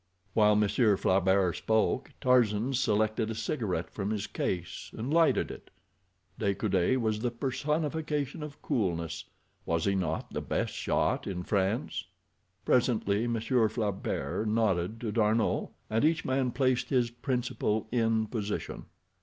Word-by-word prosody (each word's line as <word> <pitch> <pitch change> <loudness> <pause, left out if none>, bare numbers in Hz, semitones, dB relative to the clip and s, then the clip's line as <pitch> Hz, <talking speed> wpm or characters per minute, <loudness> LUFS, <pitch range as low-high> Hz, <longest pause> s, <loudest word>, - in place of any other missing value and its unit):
While 105 -1 +5
Monsieur 105 0 +3
Flaubert 95 -1 +2
spoke 110 +4 +1
Tarzan 125 -2 +3
selected 110 -2 +1
a 110 - -3
cigarette 100 - -2
from 100 -1 -3
his 105 -2 -1
case, 90 -2 -3
and 120 +7 -3
lighted 165 -1 +3
it. - - -11 0.7
De 100 -1 +1
Coude 95 +4 +1
was 110 -3 0
the 120 +2 0
personification 150 +3 -2
of 150 -1 -7
coolness—was 85 -3 -3
he 100 - +2
not 90 -5 -2
the - - -2
best - - -2
shot - - 0
in 90 -2 -3
France? 100 +4 -1 0.6
Presently 115 -3 +2
Monsieur 115 0 +2
Flaubert 105 0 -2
nodded 105 -2 +1
to 115 -3 -2
D'Arnot, 110 0 +1 0.2
and 110 +1 0
each 160 +1 +2
man 130 -1 +1
placed 130 0 +1
his 125 -3 +2
principal 120 -3 -1
in 115 -2 +2
position. 105 -2 -4
110 Hz, 130 wpm, -30 LUFS, 100-125 Hz, 0.7 s, While